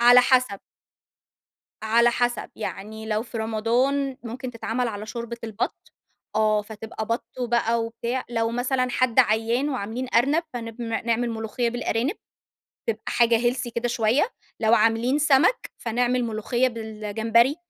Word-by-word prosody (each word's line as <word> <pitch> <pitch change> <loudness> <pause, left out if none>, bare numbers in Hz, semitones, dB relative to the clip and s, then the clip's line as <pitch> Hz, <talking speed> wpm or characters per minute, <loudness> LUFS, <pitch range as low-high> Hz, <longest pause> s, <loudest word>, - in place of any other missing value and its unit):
على 245 +1 +8
حَسَب. 250 -6 +2 1.2
على 235 +2 +4
حَسَب. 245 0 -1
يعني 220 +1 -6
لو 215 0 0
في 235 -1 -7
رمضان 245 +5 +1
ممكن 250 +2 -6
تتعمل 235 +1 -2
على 210 0 -6
شوربة 235 +1 -5
البَط، 220 0 -4 0.4
آه. 215 -1 +3
فتبقى 220 0 -7
بَط 230 +2 -1 0.2
بقى 235 -1 +1
وبتاع. 235 +3 -3
لو 225 -1 0
مثلًا 255 +1 0
حد 245 -1 +1
عيّان 230 +6 +1
وعاملين 250 -1 -3
أرنب، 280 +8 +4
فنب 230 0 -6
ن 230 0 -3
نعمل 235 +1 +1
ملوخيّة 225 +2 -2
بالأرانب، 245 - -1 0.7
تبقى 220 0 -1
حاجة 235 -1 +4
healthy 250 -1 -4
كده 240 +1 0
شويّة، 240 - +2 0.3
لو 220 +1 +5
عاملين 230 +5 +3
سَمَك، 295 - +3
فنعمل 245 +1 0
ملوخيّة 235 +3 0
بالجمبري، 225 +3 +1
235 Hz, 135 wpm, -25 LUFS, 220-250 Hz, 1.2 s, على